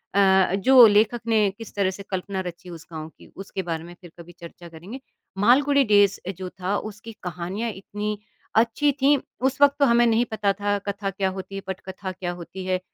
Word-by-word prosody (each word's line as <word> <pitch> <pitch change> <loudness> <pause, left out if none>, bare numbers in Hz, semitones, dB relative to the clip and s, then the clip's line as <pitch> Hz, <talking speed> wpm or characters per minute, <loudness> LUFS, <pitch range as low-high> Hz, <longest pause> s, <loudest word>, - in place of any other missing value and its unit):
अ, 190 -1 +4
जो 250 +5 +7
लेखक 215 +3 +2
ने 215 -3 +3
किस 225 - -10
तरह 200 -2 +1
से 200 +1 -9
कल्पना 190 +1 -3
रची 175 +1 -9
उस 170 0 -10
गाँव 155 -1 -7
की, - - -19
उसके 195 0 -5
बारे 165 -2 -4
में 175 +1 -11
फिर 175 -3 -13
कभी 170 +1 -11
चर्चा 170 0 -11
करेंगे। 175 +10 -10 0.4
मालगुड़ी 280 +7 +4
डेज़ 205 -4 +4 0.2
जो 185 -1 -6
था 190 +3 -1
उसकी 220 +2 -12
कहानियाँ 180 +6 -4
इतनी 210 +2 -5 0.4
अच्छी 235 +6 +3
थी, 280 +1 +3 0.3
उस 265 +1 0
वक़्त 285 0 +6
तो 280 - +5
हमें 240 -1 +4
नहीं 230 +1 +3
पता 205 -2 +1
था 205 +1 -1
कथा 200 0 -2
क्या 195 0 -1
होती 190 +1 -7
है? 195 - -4
पटकथा 190 0 -6
क्या 180 -1 -5
होती 180 +2 -8
है? 185 0 0
200 Hz, 200 wpm, -24 LUFS, 185-225 Hz, 0.4 s, जो